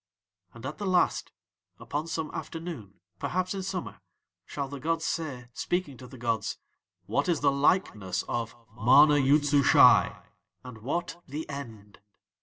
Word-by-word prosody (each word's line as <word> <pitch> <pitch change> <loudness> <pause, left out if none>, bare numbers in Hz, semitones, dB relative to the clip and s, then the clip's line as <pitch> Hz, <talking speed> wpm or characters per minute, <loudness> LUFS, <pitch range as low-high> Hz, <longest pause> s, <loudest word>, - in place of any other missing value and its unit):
"'And 115 +2 -10
at 140 +7 -6
the 205 - -3
Last, 180 -1 +1 0.5
upon 145 +8 -4
some 160 -1 -3
afternoon, 155 - -7 0.2
perhaps 185 +1 -1
in 195 - -4
summer, 190 -1 -5 0.5
shall 140 -1 -4
the 140 +1 -7
gods 165 +3 -1
say, 140 -8 -3
speaking 175 -6 -2
to 125 - -11
the 130 +1 -12
gods: 115 -2 -2 0.5
"What - - 0
is 170 - +1
the 140 -1 +4
likeness 110 - +1
of 115 -1 -3 0.2
MANA 135 +6 +6
YOOD 145 +2 +4
SUSHAI 145 -1 +5 0.4
and 125 -3 -10
what 170 +8 -3
THE 150 +4 -5
END?" 115 -8 -9
140 Hz, 145 wpm, -28 LUFS, 120-165 Hz, 0.5 s, MANA